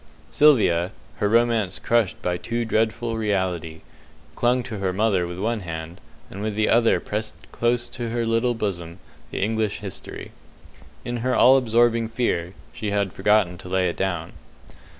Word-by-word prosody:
Sylvia 105 - +4 0.2
her 105 - +1
romance 115 -4 +2
crushed 115 -4 +1
by 90 0 0
too 115 +6 -3
dreadful 115 +1 0
reality 90 -6 -2 0.5
clung 125 +1 +2
to 115 -4 -6
her 95 -1 0
mother 95 -2 +1
with 90 0 -7
one 110 +4 -1
hand, 80 -2 -7 0.3
and 100 - -7
with 105 -1 -2
the 110 0 +1
other 115 0 +4
pressed 110 +1 -4 0.2
close 120 0 0
to 120 -1 -5
her 115 0 -1
little 115 +2 +1
bosom 85 -6 -4 0.3
the - - -2
"English 110 -1 0
History". 100 -3 -7 0.7
In 120 0 -3
her 125 +2 0
all 130 +2 +7
absorbing 115 -2 +3
fear 95 -7 -1 0.2
she 105 - -4
had 100 -2 0
forgotten 95 -3 +2
to 90 - -9
lay 95 -1 +1
it 85 - -5
down. 90 -4 -2
110 Hz, 160 wpm, -23 LUFS, 95-115 Hz, 0.7 s, all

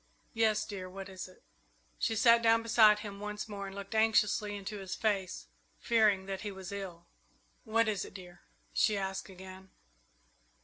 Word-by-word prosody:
"Yes, 220 -2 +2
dear; 185 -3 -6
what 195 +1 -8
is 185 -1 -7
it?" 185 - -19 0.6
She 225 - 0
sat 230 +1 +6
down 230 0 +4
beside 215 -2 +5
him 200 -2 -7
once 210 +1 -5
more 200 -2 -6
and 195 - -9
looked 200 +1 -7
anxiously 215 -1 +2
into 205 +1 -6
his 190 -1 -5
face, 195 -4 -1 0.3
fearing 215 -5 +3
that 195 -1 -4
he 210 - -4
was 190 0 -8
ill. 185 -4 -7 0.6
"What 225 0 +2
is 205 -4 0
it, - - -11
dear?" 180 -2 -11 0.3
she 215 -2 +3
asked 190 0 -3
again. 190 0 -11
200 Hz, 170 wpm, -32 LUFS, 190-215 Hz, 0.6 s, sat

